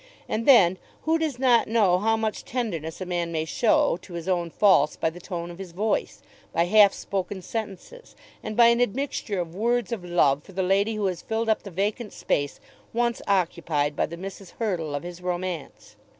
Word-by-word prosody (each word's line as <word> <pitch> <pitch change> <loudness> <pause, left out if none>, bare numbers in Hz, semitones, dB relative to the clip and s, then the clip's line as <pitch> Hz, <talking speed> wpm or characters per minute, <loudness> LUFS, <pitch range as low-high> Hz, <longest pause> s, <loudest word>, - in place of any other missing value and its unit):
And 225 +1 -2
then 190 -9 +6 0.2
who 325 +1 +2
does 310 -6 -1
not 250 -2 +4
know 205 -6 +3
how 225 +2 +2
much 220 -1 -2
tenderness 185 - -4
a - - -2
man 175 -2 -2
may 160 -1 -1
show 290 - +2
to 180 - -13
his 170 0 -6
own 175 -2 0
faults 160 -5 +4
by 160 - -1
the 175 - -11
tone 175 -1 -5
of 170 - -12
his 185 -3 -8
voice, 215 +5 -1 0.3
by 170 - +2
half 205 +1 +6
spoken 190 -1 -4
sentences, 225 - -7 0.3
and 215 0 -6
by 240 - +8
an 235 +1 +3
admixture 245 -4 -1
of 170 -2 -4
words 235 +3 0
of 220 -6 -3
love 150 -5 +2
for 195 - -15
the 190 +1 -1
lady 200 +4 +2
who 210 -1 -1
has 185 -3 -2
filled 225 0 -2
up 220 - +2
the 200 - -9
vacant 205 +5 -2
space 145 -1 -1 0.3
once 235 0 0
occupied 165 -6 0
by - - 0
the 170 - -8
Mrs. 195 0 -9
Hurtle 175 -10 -2
of 145 - -4
his 175 0 -8
romance? 180 -4 -5
195 Hz, 200 wpm, -25 LUFS, 175-225 Hz, 0.3 s, by